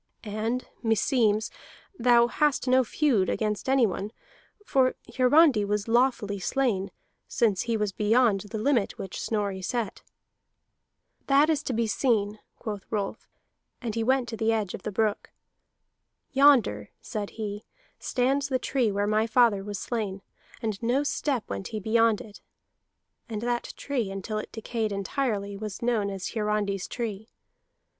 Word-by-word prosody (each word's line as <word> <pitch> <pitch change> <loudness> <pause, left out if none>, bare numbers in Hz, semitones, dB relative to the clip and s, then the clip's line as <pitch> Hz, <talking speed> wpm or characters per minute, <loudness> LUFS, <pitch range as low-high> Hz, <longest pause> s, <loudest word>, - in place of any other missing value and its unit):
And 220 +4 -2 0.2
meseems 225 -1 +2 0.4
thou 240 -5 +5
hast 280 +2 +1
no 255 +1 +5
feud 240 -5 +1
against 210 +2 -1
anyone; 220 -6 +2 0.5
for 260 -6 +2 0.2
Hiarandi 260 -2 +5
was 205 +1 -1
lawfully 235 -4 +2
slain, 200 -2 0 0.4
since 210 -5 +1
he 230 -1 -1
was 210 -2 -1
beyond 215 +1 +3
the 210 +2 -6
limit 230 -1 +1
which 190 - -6
Snorri 200 -3 -2
set." 230 +1 -3 1.3
"That 285 +3 +5
is 300 -2 +1
to 260 - -3
be 230 0 +1
seen," 215 -3 +1 0.2
quoth 210 -4 -5
Rolf, 205 -3 -3 0.5
and 235 -4 -4
he 230 0 -1
went 260 +1 +2
to 225 - -5
the 225 +1 +2
edge 215 -4 -1
of - - -6
the 215 - -4
brook. 210 +1 0 1.0
"Yonder," 260 - +4
said 210 -3 -5
he, 210 -1 -4 0.4
"stands 270 +3 0
the 265 -2 +1
tree 250 -4 0
where 200 +1 0
my 215 +2 +2
father 230 -4 +4
was 205 0 -5
slain, 200 -3 -3 0.4
and 215 -3 -2
no 245 +5 +1
step 285 -4 -1
went 100 0 -4
he 215 - -4
beyond 225 +1 +3
it. 210 -2 -13 0.9
[And 215 -1 -4
that 240 0 -2
tree, 250 -8 -2
until 195 +2 -4
it - - -7
decayed 225 -1 -3
entirely, 200 0 -2
was 210 +1 -6
known 225 -4 +1
as 195 -2 -4
Hiarandi's 210 -3 -1
tree. 220 -3 -5
220 Hz, 145 wpm, -27 LUFS, 205-245 Hz, 1.3 s, thou